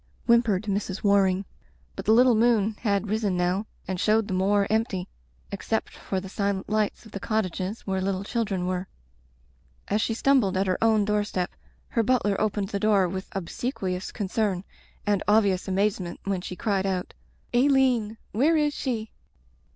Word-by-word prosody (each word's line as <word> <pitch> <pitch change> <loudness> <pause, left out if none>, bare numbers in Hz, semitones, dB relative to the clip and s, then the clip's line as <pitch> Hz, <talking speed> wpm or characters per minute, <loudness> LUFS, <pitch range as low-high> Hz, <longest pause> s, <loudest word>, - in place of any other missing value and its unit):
whimpered 230 -5 +3
Mrs. 200 -2 -3
War 200 -1 +5
ing. 185 +1 -1 0.5
But - - -6
the - - +4
little 245 +2 +6
moon 220 -2 +3
had 200 -2 0
risen 210 -3 0
now 180 +4 0 0.2
and 185 -1 -3
showed 215 +1 +2
the - - -3
moor 200 +2 +2
empty 215 -5 -1 0.4
except - - -2
for 190 - -3
the 190 - -8
silent 200 0 -2
lights 215 +2 -1
of 220 - -13
the 200 - -5
cottages 200 -1 -2
where 190 -1 -2
little 190 0 -1
children 200 -4 -1
were. 185 0 -2 1.0
As 210 +2 +1
she 225 - 0
stumbled 235 -7 +3
at 190 - +2
her 185 +3 0
own 220 -2 +4
doorstep 205 -3 -1 0.4
her 230 - +1
butler 225 -3 +2
opened 205 -2 0
the 200 - -2
door 200 -3 +3
with 190 +2 -5
obsequious 190 0 -3
con 205 -4 -3
cern, 195 -2 0 0.4
and 205 -2 +1
obvious 205 -3 +3
amazement 190 -2 -1
when 195 -2 -1
she 180 - -6
cried 195 -2 0
out 185 -1 -2 0.2
— - - -37
^"4^1een 250 -4 +3
— - - -37
^where 310 +8 +3
is 295 -1 +1
she?" 225 -6 -3
205 Hz, 175 wpm, -26 LUFS, 190-220 Hz, 1.0 s, little